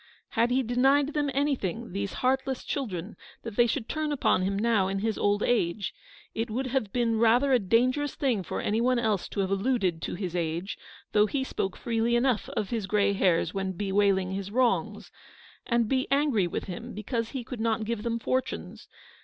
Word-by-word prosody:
Had 235 +2 +2
he 260 +2 +2
denied 270 +5 +3
them 295 -2 0
anything, 250 -7 -1
these 200 +1 -3
heartless 265 0 +1
children, 205 - -4 0.3
that 230 -3 -6
they 240 +1 +5
should 235 0 -2
turn 310 -1 -2
upon 270 -9 +2
him 195 +1 0
now 215 -3 +2
in 195 +1 -2
his 220 +2 -1
old 205 0 +1
age 200 -4 0 0.2
— - - -23
it 225 +1 -2
would 250 +5 -2
have 255 -5 -1
been 230 -2 +1
rather 240 +4 +4
a 250 - +5
dangerous 255 +8 +1
thing 250 -8 +1
for 175 - -4
anyone 240 +4 +1
else 220 -5 0
to 200 - -2
have 190 0 -1
alluded 195 -5 0
to - - -3
his 180 -2 -4
age, 170 +3 -2 0.4
though 210 0 +4
he 270 +4 -1
spoke 195 -7 -3
freely 230 0 0
enough 240 -3 +1
of 210 - -1
his 225 -5 -2
grey 200 0 +2
hairs 185 -4 +2
when 190 -1 -2
bewailing 195 -1 +1
his 195 0 -4
wrongs 245 +2 0 0.3
— - - -24
and 235 -2 +2
be 260 +2 0
angry 275 -9 +2
with - - -3
him, 225 +6 -7
because 230 +2 -2
he 265 -3 -5
could 235 -1 -6
not 225 -1 0
give 230 -1 -2
them 230 +1 -1
fortunes 255 +3 -3
225 Hz, 195 wpm, -28 LUFS, 195-255 Hz, 0.4 s, they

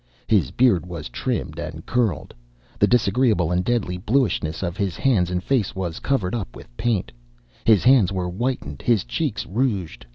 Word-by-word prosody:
His - - +2
beard 120 -9 +3
was 85 -3 -6
trimmed 105 - -3
and 80 -1 -6
curled. 115 -11 -1 0.5
The - - +5
disagreeable 110 -6 +2
and 90 +1 +1
deadly 100 -5 -1
bluishness 100 - 0
of 85 -2 -2
his 100 -5 -2
hands 105 -10 +2
and 90 0 -2
face 125 -8 0
was 90 -4 -3
covered 110 -10 -1
up 105 - -4
with - - -13
paint; 110 - -1 0.5
his 110 -4 +5
hands 125 -8 +5
were 95 -2 -2
whitened, 90 - -3
his 115 -6 +2
cheeks 145 -10 -2
rouged. 100 - -2
100 Hz, 165 wpm, -23 LUFS, 90-120 Hz, 0.5 s, The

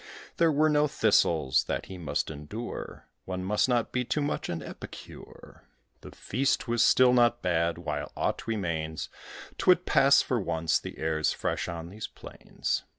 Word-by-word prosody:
There 165 -1 +4
were 155 +1 +3
no 150 -1 +3
thistles, 85 - +2
that - - -3
he 95 -1 -9
must 80 -1 -2
endure: 80 +11 -7 0.2
One 95 0 -4
must 105 +6 +1
not 120 -2 +1
be 125 - 0
too 145 +4 -1
much 145 - -2
an 85 -2 -4
epicure. - - -11 0.4
The - - -10
feast 130 +3 -1
was 120 0 +2
still 125 +1 +5
not 120 -1 +3
bad: 85 -2 +1
while - - -4
aught - - -2
remains; 85 -8 -3 0.5
'Twould 180 -1 +4
pass 140 -1 +5
for 125 - 0
once, 80 -4 0
the - - -8
air's 80 -1 0
fresh - - -2
on 85 0 -6
these 105 +4 -6
plains. - - -4
105 Hz, 160 wpm, -28 LUFS, 85-130 Hz, 0.5 s, still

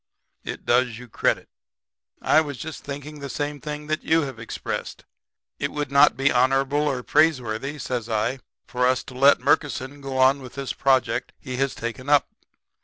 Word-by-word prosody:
It - - -6
does 125 -1 +2
you 125 +1 -11
credit. - - 0 0.8
I 155 - +5
was 145 -4 -5
just 160 +3 -7
thinking 145 +1 -7
the 140 -1 -6
same 145 +2 -3
thing 150 -1 -5
that 155 +1 -1
you 165 +1 +3
have 135 -2 -6
expressed. - - -5 0.5
It - - -1
would 145 -2 -3
not 140 +1 +5
be 135 +1 +3
honorable 135 +4 +2
or 130 -3 -1
praiseworthy,' 135 -3 +1
says 125 -4 -4
I, 115 +4 0 0.3
'for 125 0 +1
us 130 0 +1
to 125 - -11
let 135 +2 +5
Murkison 140 0 0
go 135 -1 -4
on 130 +2 +4
with 130 -2 -11
this 140 -1 -3
project 130 -2 +1
he 130 -1 -6
has 135 0 0
taken 120 +4 -5
up. 145 -1 +5
135 Hz, 180 wpm, -24 LUFS, 125-145 Hz, 0.8 s, I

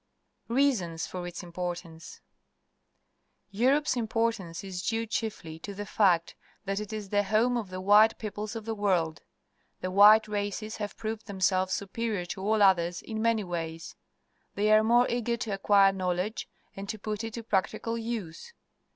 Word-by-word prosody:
Reasons 230 -11 +1
for 180 -1 -6
its 175 +1 -7
Importance. 175 -1 -6 0.6
— - - -47
Europe's 280 +3 +3
im 235 -3 -1
portance 225 -7 -1
is 185 -2 -5
due 225 +4 -1
chiefly 210 -8 -4
to 200 +4 -7
the 205 +1 -5
fact 185 -5 +2 0.3
that 195 0 -1
it 210 0 -6
is 210 -2 -5
the 205 0 +2
home 220 +5 +2
of 225 -5 -3
the 185 0 -6
white 210 +3 +5
peoples 210 +1 -5
of 225 -2 -6
the 225 - -2
world. 180 -7 0 0.6
The 185 - -3
white 210 +3 +7
races 210 +1 -3
have 205 -1 -5
proved 220 0 -5
themselves 190 -1 +1
superior 205 -1 -3
to 190 - -9
all 210 +1 +2
others 175 -2 +3
in 220 -1 -5
manv' 225 -2 +1
ways. 165 -2 -5 0.6
They 210 +1 +2
are 215 0 +6
more 240 +2 +4
eager 235 0 -1
to 220 - -4
acquire 195 0 +4
knowledge 185 +3 -2 0.3
and 195 +1 -7
to 220 - -3
put 210 +1 -4
it 225 -1 -5
to 230 - -6
practical 220 +2 -1
use. 225 - -5
205 Hz, 170 wpm, -28 LUFS, 185-225 Hz, 0.6 s, white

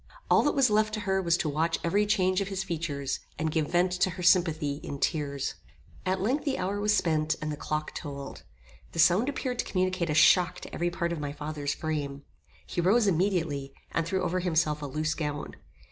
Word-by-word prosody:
All - - +6
that 295 - +1
was 265 -5 +4
left 215 +1 +2
to 215 - -4
her 190 -1 +1
was 170 -1 +2
to - - -1
watch 160 +3 0
every 205 +5 +2
change 185 -2 +2
of 195 - -2
his 195 -1 -3
features, 155 -6 -3 0.2
and 160 0 -1
give 155 -2 0
vent 180 +1 +3
to 180 +1 +1
her 180 0 -6
sympathy 160 -5 +3
in 140 - -6
tears. 140 -2 -1 0.5
At 185 +1 +1
length 255 +9 0
the 275 -3 -1
hour 195 +2 -2
was 210 +1 +2
spent, 155 -2 +1
and 155 -1 -3
the - - -3
clock 155 +1 -3
tolled. 140 -3 -7 0.5
The - - -8
sound 175 - +4
appeared 255 -3 -3
to - - 0
communicate 185 -2 0
a 150 - 0
shock 180 +3 +5
to - - -10
every 175 +1 0
part 170 0 -2
of 165 - -4
my 145 -1 -4
father's 150 -1 -3
frame. 145 -3 -3 0.4
He 175 - -2
rose 210 +6 +4
immediately, 165 -7 0 0.2
and 165 - 0
threw 185 +3 -1
over 185 +2 0
himself 160 -4 +1
a 145 - -4
loose 155 +3 -1
gown. 150 -2 -4
170 Hz, 210 wpm, -28 LUFS, 150-190 Hz, 0.5 s, All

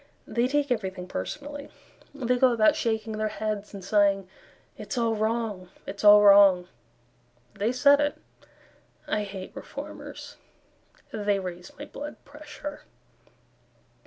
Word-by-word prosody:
They 240 +1 0
take 285 0 0
everything 190 -5 -2
personally; 290 +7 -6 0.4
They 250 -3 -1
go 255 -1 +5
about 215 -2 +4
shaking 220 -1 -2
their 215 - +1
heads, 210 -1 -4
And 195 -3 -9
sighing, 200 -2 +2 0.5
"It's 275 - -6
all 230 -1 +2
wrong, 215 -4 -2 0.2
it's 200 - -7
all 210 0 +9
wrong," 200 -3 +7 0.9
They 205 +4 0
said 280 +3 +5
it. 290 0 +1 0.9
I 210 - -1
hate 195 -2 -8
Reformers; - - -9 0.7
They 205 -2 0
raise 180 -2 -7
my 290 - -7
blood 295 0 -8
pressure. 295 0 -9
215 Hz, 125 wpm, -27 LUFS, 200-260 Hz, 0.9 s, all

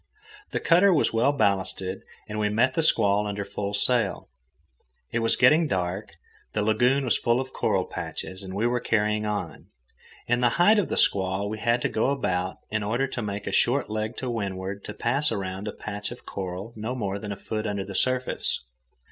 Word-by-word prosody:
The - - -2
cutter 180 +4 +5
was 165 - +2
well 115 +5 +3
ballasted, 95 -6 0 0.3
and 105 0 -4
we 105 0 +1
met 115 +5 +2
the 165 - +1
squall 105 -9 +3
under 100 -1 -3
full 100 0 -4
sail. 115 -1 +1 0.8
It 120 - 0
was 115 0 +2
getting 160 +1 +5
dark, 95 -2 -2 0.4
the 105 - 0
lagoon 120 +6 +3
was 120 - +2
full 120 +1 +2
of 130 0 -5
coral - - +1
patches, 95 +1 -6
and 95 -1 -7
we 105 +3 0
were 120 +1 +1
carrying 105 -1 +1
on. 100 -6 -4 0.6
In 120 0 +1
the 120 - +5
height 205 +5 +6
of 195 - -1
the - - -1
squall 95 +1 +2
we 110 +1 -4
had 120 +2 +1
to - - +3
go 110 - 0
about, 95 -9 -1
in 110 0 0
order 115 +6 0
to 125 - -4
make 100 -1 -4
a - - -3
short 125 -2 +2
leg 110 +2 -3
to 130 - -3
windward 100 -4 -3
to - - -6
pass 135 +4 +1
around 95 -1 -4
a - - -2
patch 105 -1 -5
of 120 - -10
coral 95 +3 -5
no 110 +4 -4
more 100 -5 -2
than 105 0 -6
a - - -3
foot 110 +2 -4
under 100 -1 -2
the 100 - -7
surface. 130 +5 0
105 Hz, 200 wpm, -26 LUFS, 100-125 Hz, 0.8 s, height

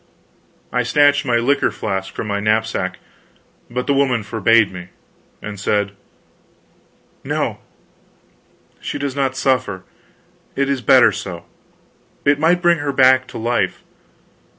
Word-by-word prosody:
I 125 - +2
snatched 145 +3 +3
my 120 - +2
liquor 125 +5 +2
flask 95 -2 -4
from - - -5
my 100 -1 -2
knapsack, 110 +2 -1 0.7
but 125 +1 -3
the 140 - +1
woman 130 -5 +1
forbade 110 -1 +2
me, 90 -1 -8 0.6
and 105 -2 -7
said: 100 0 0 1.3
"No - - -2 1.2
she - - -5
does 140 -2 -3
not 135 -2 -1
suffer; 125 -9 0 0.7
it 140 0 0
is 140 -2 -1
better - - +6
so. - - -7 0.8
It 145 0 +3
might 175 +3 +2
bring 170 -1 +4
her 145 -1 -2
back 130 -1 +4
to - - -9
life. 120 +2 -1
125 Hz, 130 wpm, -19 LUFS, 105-140 Hz, 1.3 s, better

